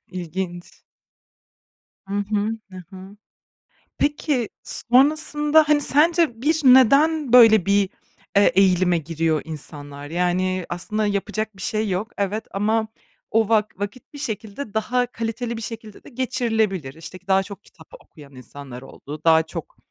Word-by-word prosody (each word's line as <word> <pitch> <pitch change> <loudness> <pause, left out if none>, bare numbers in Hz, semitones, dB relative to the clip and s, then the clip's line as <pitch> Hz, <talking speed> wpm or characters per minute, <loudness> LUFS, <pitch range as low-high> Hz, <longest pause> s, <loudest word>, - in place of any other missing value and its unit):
İlginç. 175 0 -6 1.3
Hı 200 - -6
hı. 205 +1 -1 0.2
Hı 185 - -10
hı. 190 +1 -12 0.8
Peki 290 -5 0
sonrasında 300 +3 +3
hani, 295 -1 +4
sence 305 -4 +2
bir 315 +3 +1
neden 275 +2 +5
böyle 220 -5 +7
bir, 200 -1 +2 0.5
eee, 200 - +5
eğilime 185 -2 +3
giriyor 160 0 -1
insanlar? 145 -2 -9
Yani 180 +2 -1
aslında 210 +5 -2
yapacak 210 +1 -3
bir - - -11
şey 215 +2 -2
yok, 195 +5 -3
evet 205 +2 -2
ama 220 +2 0 0.4
o 225 -1 +2
vak 215 -3 +1
vakit 205 +8 -7
bir 290 - -9
şekilde, 220 -2 -6
daha 245 +3 0
kaliteli 230 0 -4
bir - - -6
şekilde 220 -2 -9
de - - -13
geçirilebilir. 225 - -1
İşte 165 +4 -10
k 185 - -36
daha 190 0 +3
çok 200 0 -11
kitap 160 -2 -19
okuyan 140 -3 -17
insanlar 130 0 -10
oldu, 145 +3 -10
daha 160 -1 +5
çok - - -9
210 Hz, 140 wpm, -22 LUFS, 180-245 Hz, 1.3 s, böyle